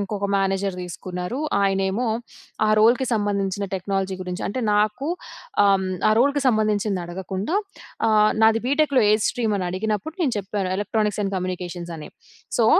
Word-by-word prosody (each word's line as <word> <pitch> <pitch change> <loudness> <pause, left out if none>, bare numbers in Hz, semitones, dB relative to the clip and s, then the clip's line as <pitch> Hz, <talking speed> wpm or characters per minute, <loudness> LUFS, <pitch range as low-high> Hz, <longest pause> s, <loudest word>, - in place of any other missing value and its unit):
ఇంకొక 200 0 -2
మేనేజర్ 195 -1 0
తీసుకున్నారు. 180 +4 -5 0.2
ఆయనేమో 195 +4 +1 0.6
ఆ - - +2
రోల్‌కి 240 +4 +4
సంబంధించిన 200 -2 0
టెక్నాలజీ 190 0 -2
గురించి 180 -1 -5
అంటే 255 +6 -3
నాకూ 210 +7 +1 0.6
ఆహ్, 200 - +5
హ్మ్, 190 0 -3 0.2
ఆ - - +4
రోల్‌కి 280 +2 +3
సంబంధించింది 215 -4 +1
అడగకుండా, 190 - -4 0.5
ఆహ్, 215 -1 +5
నాది 225 0 +5
బీటెక్‌లో 280 -2 +3
ఏ - - +6 0.2
స్ట్రీమ్ 225 -4 0
అని 180 - -2
అడిగినప్పుడు, 215 - -2
నేను 275 -6 +1
చెప్పాను 195 -1 -3
ఎలక్ట్రానిక్స్ 210 +1 0
అండ్ 195 -1 -2
కమ్యూనికేషన్ 180 -1 -4
అని. 155 - -9 0.5
సో, - - +4
205 Hz, 145 wpm, -23 LUFS, 190-220 Hz, 0.6 s, ఏ